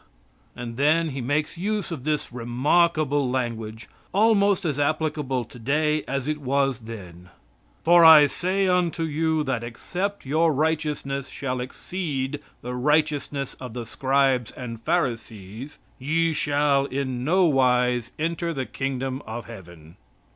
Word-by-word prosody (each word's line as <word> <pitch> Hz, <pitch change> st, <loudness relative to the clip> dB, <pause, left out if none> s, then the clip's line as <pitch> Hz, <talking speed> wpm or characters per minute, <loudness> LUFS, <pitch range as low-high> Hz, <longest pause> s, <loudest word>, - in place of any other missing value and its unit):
And 120 Hz, -1 st, -7 dB
then 155 Hz, +4 st, +3 dB
he 135 Hz, -2 st, -4 dB
makes 150 Hz, +6 st, -1 dB
use 210 Hz, 0 st, -2 dB
of 145 Hz, -6 st, -6 dB
this 150 Hz, -5 st, -1 dB
remarkable 145 Hz, +3 st, +2 dB
language, 115 Hz, -3 st, -3 dB, 0.3 s
almost 200 Hz, -2 st, +3 dB
as 145 Hz, -3 st, -1 dB
applicable 150 Hz, -4 st, 0 dB
today 150 Hz, +7 st, 0 dB
as 135 Hz, 0 st, -2 dB
it 155 Hz, 0 st, -1 dB
was 135 Hz, -2 st, +1 dB
then: 90 Hz, -6 st, -10 dB, 0.5 s
"For 175 Hz, 0 st, +6 dB
I 160 Hz, -2 st, +10 dB
say 185 Hz, +7 st, 0 dB
unto 180 Hz, -2 st, +1 dB
you 160 Hz, 0 st, 0 dB
that 130 Hz, -5 st, -2 dB
except 180 Hz, -, -4 dB
your 155 Hz, +4 st, +2 dB
righteousness 150 Hz, -3 st, -1 dB
shall 130 Hz, -2 st, -3 dB
exceed 140 Hz, 0 st, -4 dB, 0.2 s
the 125 Hz, +1 st, -4 dB
righteousness 145 Hz, 0 st, 0 dB
of 125 Hz, -3 st, -8 dB
the 120 Hz, -2 st, -4 dB
Scribes 130 Hz, -1 st, +1 dB
and 115 Hz, -3 st, -7 dB
Pharisees 115 Hz, -, -3 dB, 0.2 s
ye 165 Hz, +5 st, +1 dB
shall 145 Hz, -2 st, +2 dB
in 130 Hz, -2 st, -3 dB
no 180 Hz, +6 st, +3 dB
wise 125 Hz, -5 st, +2 dB
enter 165 Hz, +1 st, -2 dB
the 130 Hz, -1 st, -2 dB
kingdom 135 Hz, 0 st, -3 dB
of 115 Hz, +2 st, -6 dB
Heaven." 85 Hz, -7 st, -12 dB
140 Hz, 135 wpm, -24 LUFS, 125-160 Hz, 0.5 s, I